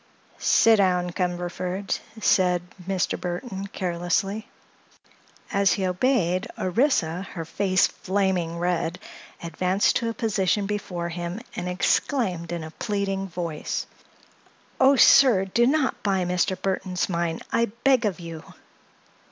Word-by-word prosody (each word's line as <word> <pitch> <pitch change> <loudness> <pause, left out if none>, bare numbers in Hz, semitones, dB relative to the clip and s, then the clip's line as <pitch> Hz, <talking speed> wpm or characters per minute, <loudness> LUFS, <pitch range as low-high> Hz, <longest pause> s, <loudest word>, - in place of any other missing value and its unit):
"Sit 225 -1 +5
down, 180 -2 +2
Cumberford," 180 +2 -2 0.2
said 180 -4 +3 0.2
Mr. 190 -2 -1
Burthon, 190 +2 -4
carelessly. 185 +4 -1 1.0
As 200 0 +3
he 190 - -1
obeyed, 185 0 +1
Orissa, 185 - +1
her 165 -2 -4
face 185 +3 +2
flaming 185 -3 -1
red, 175 -1 -1 0.5
advanced 180 +4 +1
to 230 - -2
a 230 - -5
position 205 -3 0
before 185 -4 -3
him 175 +3 -5 0.2
and 180 0 -3
exclaimed 180 - 0
in 170 -2 -3
a 155 - -8
pleading 195 0 -2
voice: 170 -3 -4 0.9
"Oh, 270 +2 +6
sir, 245 -7 +6
do 235 +5 +2
not 285 0 +1
buy 190 -3 0
Mr. 180 +1 0
Burthon's 185 -1 -1
mine, 170 -2 -1
I 230 - +3
beg 240 +3 +1
of 195 -4 -1
you!" 165 -2 -8
185 Hz, 120 wpm, -25 LUFS, 175-205 Hz, 1.0 s, Oh